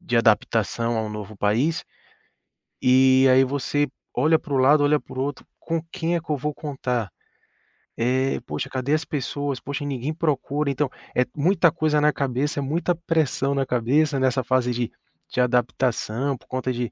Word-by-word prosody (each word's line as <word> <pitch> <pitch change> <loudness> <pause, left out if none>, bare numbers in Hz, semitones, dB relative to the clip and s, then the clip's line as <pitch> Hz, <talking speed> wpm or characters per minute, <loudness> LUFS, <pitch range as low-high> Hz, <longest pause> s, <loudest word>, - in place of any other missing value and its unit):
de 170 -9 -1
adaptação 115 0 +2
a - - 0
um 110 - -4
novo 105 0 -7
país. 120 +12 +1 1.0
E 130 +1 +5
aí 130 +1 +6
você 145 +2 0 0.3
olha 155 +5 +3
para 155 -3 -7
o 135 - +3
lado, 145 +3 +5
olha 150 0 +3
para - - -12
o 130 - 0
outro, 145 -1 -5
com 165 -1 -2
quem 170 -2 -1
é - - +1
que 165 - -24
eu 150 - +1
vou 150 +3 -3
contar? 125 -8 -3 0.9
Eh, 130 +3 +1
poxa, - - -4
cadê 130 +2 -1
as 155 +1 +1
pessoas? 145 -2 -3
Poxa, 140 +3 -5
ninguém 140 +2 -3
procura. 150 -2 -1
Então 140 +1 0 0.3
é 125 - +3
muita 170 +2 +3
coisa 155 -2 +1
na 150 0 +3
cabeça, 140 +2 -1
é - - 0
muita 165 +6 0
pressão 160 -5 0
na 135 -1 +1
cabeça 135 +4 +1
nessa 130 0 +1
fase 125 0 +1
de 120 -1 -2 0.4
de - - -1
adaptação, 125 +1 0
por - - -25
conta 130 0 -2
de 120 -1 -3
135 Hz, 180 wpm, -24 LUFS, 125-150 Hz, 1.0 s, aí